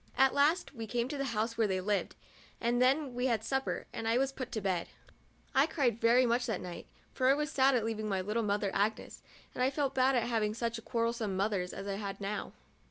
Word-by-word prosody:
At 265 0 +5
last 300 +6 +2
we 225 -4 -6
came 240 +2 -1
to 290 - -4
the 275 - 0
house 230 -1 -2
where 220 - +4
they 190 -1 0
lived, 200 +2 -1 0.4
and 240 +1 +1
then 270 +1 +3
we 245 +1 0
had 225 -3 0
supper, 265 +3 -2
and 225 - -4
I 230 +1 +3
was 270 +1 +1
put 265 -2 -6
to 220 - -1
bed. 185 -4 -1 0.7
I 270 +3 +4
cried 255 -8 0
very 240 +2 +5
much 240 +1 +1
that 225 - -1
night, 175 -1 -8 0.3
for 255 - +1
I 270 - +6
was 300 +1 -2
sad 270 -2 +4
at 230 -3 +1
leaving 215 -1 -2
my 190 -2 0
little 210 +5 -1
mother 205 -2 0
Agnes, 215 +2 -1 0.3
and - - -4
I 260 - +4
felt 280 -1 -1
bad 260 +1 +3
at 240 - +2
having 220 -3 0
such 230 -1 -3
quar 230 -2 0
relsome 230 -4 -2
mothers 195 -2 0
as 195 - -7
I 200 0 -3
now 200 +1 -2
had. - - -14
230 Hz, 235 wpm, -32 LUFS, 210-260 Hz, 0.7 s, I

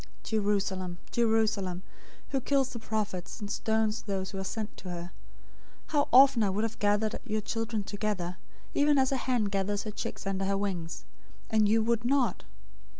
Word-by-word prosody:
023:037 - - -16 0.2
"Jerusalem, 195 -4 0
Jerusalem, 215 -5 +1 0.5
who 270 -1 0
kills 270 0 +2
the 235 - -5
prophets, 210 -5 -3
and 205 -1 -5
stones 220 -1 +1
those 190 -2 -3
who 195 - -5
are - - -2
sent 215 +2 -4
to 185 - -8
her! 175 0 -5 0.8
How 290 -2 +2
often 265 -1 +8
I 205 - +3
would 200 +3 0
have 225 - -3
gathered 210 +1 +1
your 215 -3 -1
children 225 0 -2
together, 195 -3 -2 0.4
even 290 0 +4
as 265 0 +3
a 270 - +1
hen 250 -3 +1
gathers 200 0 -1
her 215 - -4
chicks - - -5
under 195 0 -1
her 195 0 +1
wings, 170 - -3 0.5
and 215 -2 +4
you 220 +1 +4
would 235 0 +1
not! 265 +1 +1
210 Hz, 175 wpm, -30 LUFS, 195-225 Hz, 0.8 s, often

